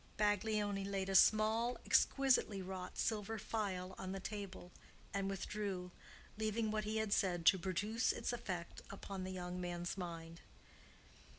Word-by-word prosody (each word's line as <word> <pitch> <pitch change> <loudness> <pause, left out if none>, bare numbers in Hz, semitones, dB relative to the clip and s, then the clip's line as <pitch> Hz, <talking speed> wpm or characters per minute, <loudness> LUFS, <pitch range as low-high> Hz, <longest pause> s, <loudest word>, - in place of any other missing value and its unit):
Baglioni 205 -1 +1
laid 195 -1 -2
a 195 - 0
small, 220 +5 +5
exquisitely 265 -7 +4
wrought 185 -1 -6
silver 220 0 0
vial 190 -4 -2
on 190 0 -4
the 195 - -3
table 195 -3 -6 0.4
and 195 0 0
withdrew, 195 -2 -3 0.5
leaving 220 0 0
what 215 -1 -1
he 215 +1 -1
had 220 -2 +1
said 175 -4 +1
to 190 - +7
produce 205 +6 +1
its - - -2
effect 185 -8 -4
upon 195 -1 -6
the 185 - -4
young 180 -1 -4
man's 175 +1 -3
mind. 165 -2 -6
195 Hz, 140 wpm, -38 LUFS, 185-215 Hz, 0.5 s, to